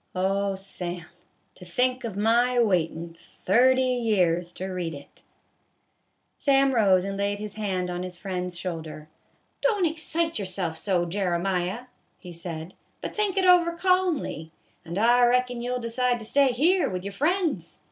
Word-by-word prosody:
Oh, 195 +1 0
Sam, 180 -3 -6 0.5
to - - -14
think 250 +8 0
of 220 -4 -5
my 240 +4 +2
waitin' 170 -6 0 0.3
thirty 255 +6 +4
years 195 -9 +1
to 185 - -6
read 180 -4 -4
it! 140 - -14 0.6
" - - -47
Sam 275 -1 +3
rose 195 -6 +4
and 195 0 -4
laid 200 0 0
his 210 0 -6
hand 190 -4 -2
on 175 0 -3
his 180 -1 -6
friend's 180 -2 -4
shoulder. 160 -3 -6 0.3
" - - -43
Don't 420 -7 +2
excite 325 0 -1
yourself 185 -4 -2
so, 175 0 0
Jeremiah," 180 +2 -1 0.4
he 180 - -11
said, 170 0 -6
" - - -42
but - - -6
think 415 -2 0
it 380 - +3
over, 350 -2 +5
calmly, 350 - 0 0.3
and 170 +2 -6
I 240 +3 +4
reckon 245 0 +2
you 245 - -4
'11 250 0 -2
decide 245 +1 +1
to 225 - -7
stay 275 +3 +3
here 340 +9 +2
with 185 0 -5
your 200 - -4
friends. 300 - -1
200 Hz, 165 wpm, -26 LUFS, 180-255 Hz, 0.6 s, over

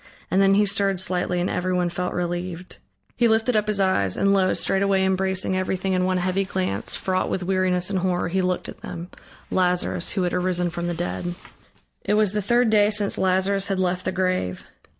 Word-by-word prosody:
And 190 - +3
then 195 0 +5
he 205 +1 +4
stirred 195 -1 +1
slightly 180 -1 0
and 175 - 0
everyone 180 -1 0
felt 180 +1 -3
relieved. 175 0 -4 0.4
He 235 - +3
lifted 225 +2 +2
up 210 0 +1
his 210 -1 +1
eyes, 100 - +1
and 195 0 +3
lo! 190 -1 +3
straightway 195 0 +1
embracing 190 0 0
everything 185 0 -1
in 185 0 +1
one 185 0 +1
heavy 185 +2 0
glance, 185 - -2
fraught 185 -1 -1
with 185 - -2
weariness 185 0 0
and 190 - 0
horror, 180 -1 0
he 190 +3 0
looked 180 0 -1
at - - -10
them, 175 +2 -7 0.4
Lazarus 180 -1 0
who 190 - 0
had 175 - -1
arisen 180 -1 0
from 170 0 -4
the 175 - -2
dead. 175 +1 -3 0.7
It 210 - +1
was 210 -2 +2
the 210 - 0
third 240 +3 +2
day 210 -1 +4
since 210 -1 +1
Lazarus 190 +1 +2
had 195 - -1
left 185 0 -1
the 185 - 0
grave. 185 - -1
185 Hz, 200 wpm, -23 LUFS, 180-195 Hz, 0.7 s, then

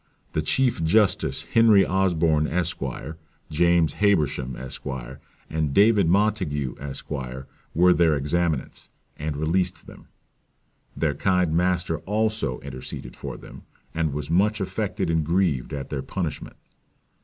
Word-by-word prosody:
"The 75 - +1
chief 120 +4 +1
justice 100 +4 +2
Henry 110 -4 +6
Osborne, 85 -5 +2
Esq.; 90 +1 -2 0.7
James 85 0 +3
Habersham, 75 -10 +1
Esq.; 65 +1 -8 0.6
and 80 -3 -2
David 105 -3 +5
Montague, 90 - +1
Esq.; 70 +2 -7 0.6
were 90 +2 +6
their 85 -3 +3
examinants, 75 0 -1 0.3
and 75 -1 -3
released 85 +3 -1
them. - - -14 0.9
Their 75 -3 +1
kind 90 +1 +1
master 90 -2 +1
also 110 - -1
interceded 65 -2 -7
for - - -7
them; - - -12 0.3
and 80 -2 0
was 75 +1 -4
much 105 +5 +2
affected 95 -3 -2
and 80 -1 +1
grieved 80 -6 0
at 70 -1 -5
their 70 -3 -2
punishment." 80 +3 -5
85 Hz, 120 wpm, -24 LUFS, 75-95 Hz, 0.9 s, Henry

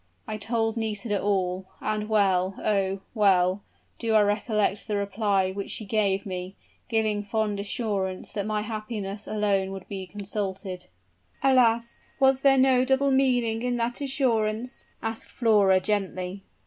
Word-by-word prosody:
I 215 - -4
told 225 +1 -1
Nisida 210 -2 -1
all: 190 -2 0
and 215 0 -2
well 190 -3 +2
oh! 195 -2 0
well 190 -3 +3 0.4
do 225 -2 0
I 215 - +6
recollect 210 0 0
the 210 - -1
reply 200 -1 +1
which 200 +1 -5
she 215 - -3
gave 200 -1 +1
me, 185 0 -5 0.3
giving 215 -3 +1
fond 210 -1 -1
assurance 200 -3 -2
that 200 -1 -3
my 215 -1 0
happiness 215 -2 -5
would - - -4
alone 195 -2 0
be 190 -2 -6
consulted." 195 -2 -5 0.6
"Alas! 235 -3 +3 0.2
Was 265 -1 +4
there 270 -1 +5
no 260 -1 +5
double 270 +1 +2
meaning 245 -4 +2
in 245 0 0
that 240 +3 -2
assurance?" 245 -3 0 0.2
asked 225 0 -4
Flora, 205 -5 +4
gently. 190 -1 -2
210 Hz, 140 wpm, -26 LUFS, 195-230 Hz, 0.6 s, I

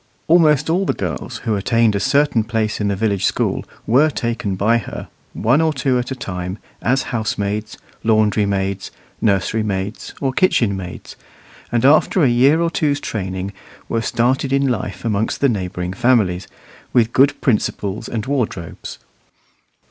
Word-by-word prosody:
Almost 155 -4 +4
all 175 +4 +1
the - - 0
girls - - -4
who 110 -2 +1
attained 115 +2 +2
a 100 - 0
certain 140 +1 +2
place 110 -2 -1
in 105 - +1
the 100 - 0
village 100 -2 0
school - - 0 0.2
were 135 +7 +4
taken 115 -8 -2
by 110 +5 +2
her, - - -8 0.2
one 125 +8 +2
or 160 -1 +2
two 130 -3 0
at 125 - -4
a 130 - -3
time, 90 -5 -5 0.2
as 130 +3 0
housemaids, 105 -2 -2 0.3
laundrymaids, 100 -3 +1 0.3
nurserymaids, 100 0 -1
or 135 -2 -1
kitchenmaids, 100 - 0 0.6
and 120 +1 +1
after 155 +4 +4
a - - +6
year 135 +7 +4
or 170 -1 +1
two's 145 -3 0
training 95 -4 -4 0.3
were 115 - -1
started 130 +4 0
in 140 0 +2
life 100 -6 -3
amongst 110 -1 0
the 140 - +4
neighbouring 90 -4 -3
families, 110 -6 +2 0.5
with 115 -1 +3
good 140 +2 +4
principles 105 -2 -1
and 110 -2 -3
wardrobes. 120 - -3
115 Hz, 150 wpm, -19 LUFS, 100-130 Hz, 0.6 s, a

